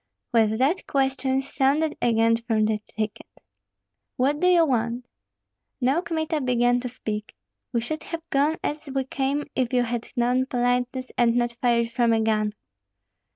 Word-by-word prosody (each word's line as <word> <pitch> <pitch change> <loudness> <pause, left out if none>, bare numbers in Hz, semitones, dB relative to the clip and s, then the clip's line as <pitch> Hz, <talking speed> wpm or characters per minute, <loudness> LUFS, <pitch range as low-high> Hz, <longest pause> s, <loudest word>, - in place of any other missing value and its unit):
With 220 -2 +3
that 280 +10 +1
questions 270 0 0
sounded 295 +3 +2
again 230 -1 +3
from 230 -2 0
the 215 0 +1
thicket. 215 0 -5 0.9
"What 280 +3 +1
do 360 - +3
you 350 -2 +5
want?" 240 -2 -1 0.7
Now 270 +6 +2
Kmita 320 -3 -2
began 245 -1 +2
to 250 0 -4
speak. 215 -3 -5 0.4
"We 235 - 0
should 310 +6 -4
have 330 -1 -6
gone 290 +4 +2
as 300 +1 -3
we 270 0 0
came 275 +2 -1
if 255 -2 0
you 245 -1 +3
had 240 -1 -3
known 250 +2 +1
politeness 250 +1 -1
and 235 -1 +4
not 240 -1 +1
fired 235 -1 +2
from 235 -1 +2
a 225 - +2
gun." 215 -1 +1
250 Hz, 155 wpm, -25 LUFS, 235-275 Hz, 0.9 s, you